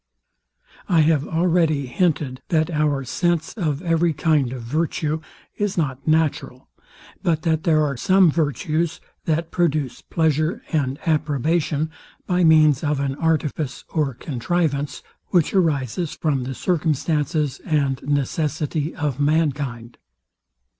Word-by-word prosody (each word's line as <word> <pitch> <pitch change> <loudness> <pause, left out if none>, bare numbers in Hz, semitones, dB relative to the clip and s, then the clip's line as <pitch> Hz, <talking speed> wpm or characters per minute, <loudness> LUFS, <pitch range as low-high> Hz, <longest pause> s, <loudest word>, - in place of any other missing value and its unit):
I 165 -3 +5
have 150 -2 +2
already 165 -4 +2
hinted, 140 -2 -1
that 160 -1 +1
our 150 -3 +1
sense 165 +5 -1
of 155 -6 -2
every 165 -1 +2
kind 150 -6 +1
of 125 -2 -6
virtue 155 +3 -1 0.4
is 205 -2 -1
not 140 -4 -2
natural; 155 -5 0 0.5
but 160 -3 0
that 160 -2 0
there 155 -2 +4
are 140 -1 -2
some 185 +4 +4
virtues, 155 +1 -1 0.3
that 165 +1 -1
produce 155 -7 0
pleasure 160 0 0
and 140 -5 0
approbation 155 0 0 0.3
by 180 -1 +1
means 155 -3 +5
of 150 -2 0
an 140 -1 -1
artifice 155 -2 -1
or 145 -5 -1
contrivance, 145 +2 -2 0.2
which 175 -5 +2
arises 160 - 0
from 140 -5 -1
the 130 0 -5
circumstances 155 -3 0
and 140 -5 0
necessity 150 +2 -1
of 145 -4 -2
mankind. 140 -6 -1
155 Hz, 120 wpm, -22 LUFS, 140-165 Hz, 0.5 s, I